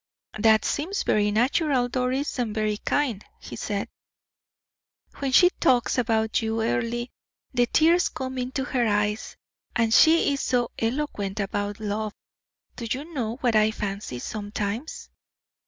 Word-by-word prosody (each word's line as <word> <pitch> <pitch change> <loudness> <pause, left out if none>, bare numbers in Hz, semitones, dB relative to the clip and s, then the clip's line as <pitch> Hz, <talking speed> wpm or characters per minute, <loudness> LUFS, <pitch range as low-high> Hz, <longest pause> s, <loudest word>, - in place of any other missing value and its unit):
"That 220 0 +4
seems 350 +8 -1
very 210 -1 +2
natural, 250 +4 +2
Doris, 255 +3 -1
and 225 -3 -1
very 215 -1 0
kind," 245 -5 -1 0.2
he - - -9
said. 200 -1 -3 1.3
"When 275 -1 -1
she 355 +7 +6
talks 245 -2 +3
about 220 -2 +1
you, 225 0 -1
Earle, 230 - -1 0.5
the 245 -1 +2
tears 335 +6 +4
come 260 0 -5
into 255 +2 -2
her 250 -4 0
eyes, 210 +1 -1 0.4
and 230 -2 +2
she 320 0 +5
is 275 - -2
so 245 -2 0
eloquent 225 -5 -2
about 205 +1 -2
love. 215 0 -3 0.6
Do 235 - -5
you 290 +8 -4
know 230 -5 -2
what 240 -3 +2
I 215 0 +5
fancy 200 -9 -4
sometimes?" 210 - -5
230 Hz, 140 wpm, -25 LUFS, 210-260 Hz, 1.3 s, she